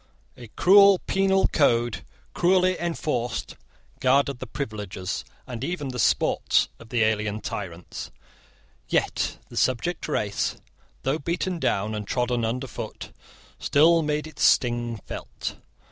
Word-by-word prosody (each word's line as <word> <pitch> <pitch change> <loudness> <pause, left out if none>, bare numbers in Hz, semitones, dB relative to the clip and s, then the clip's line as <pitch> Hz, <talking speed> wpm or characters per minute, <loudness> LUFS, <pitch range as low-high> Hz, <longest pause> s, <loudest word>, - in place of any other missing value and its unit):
A 120 - -11
cruel 200 +1 +7
penal 195 0 +3
code, 120 -6 +2 0.3
cruelly 185 +1 +3
enforced, 150 -8 -2 0.4
guarded 135 0 +2
the 130 - -6
privileges, 105 -7 -4 0.2
and 125 -2 -6
even 150 -3 -3
the 125 -1 -5
sports, 85 -8 +2
of 115 - -14
the 120 -1 +2
alien 105 -1 0
tyrants. 90 -5 -6 0.8
Yet - - 0
the - - -9
subject 130 +7 0
race, 105 -9 -1 0.5
though 135 +4 0
beaten 170 +3 -2
down 105 -6 0
and 105 -1 -4
trodden 120 -1 0
underfoot, 125 +4 -4 0.5
still 165 +3 +4
made 150 0 -1
its 155 -2 -10
sting 120 -2 +3
felt. - - -6
125 Hz, 120 wpm, -25 LUFS, 110-160 Hz, 0.8 s, cruel